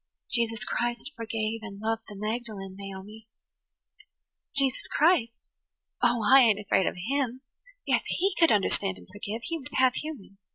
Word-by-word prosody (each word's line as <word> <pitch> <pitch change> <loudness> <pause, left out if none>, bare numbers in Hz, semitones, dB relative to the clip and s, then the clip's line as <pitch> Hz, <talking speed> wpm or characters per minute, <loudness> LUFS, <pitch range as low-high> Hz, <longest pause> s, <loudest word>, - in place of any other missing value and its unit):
"Jesus 225 -3 +1
Christ 240 +3 -2
forgave 225 -1 -2
and 205 -3 -8
loved 225 +1 -1
the 210 - -9
Magdalen, 210 -2 -4
Naomi." 200 +3 -9 1.3
"Jesus 275 -2 +1
Christ? 290 -8 +2 0.5
Oh, 240 -2 +3
I 270 +3 +9
ain't 220 -4 +5
afraid 195 -2 +2
of - - -1 0.2
Him. 260 -3 0 0.4
Yes, - - +3
He 390 +2 +1
could 330 -1 +6
understand 195 -1 +1
and - - -14
forgive. 210 +3 -5
He 330 -1 -3
was 260 - -8
half 260 -1 +5
human. 255 -11 -7
225 Hz, 150 wpm, -28 LUFS, 210-255 Hz, 1.3 s, I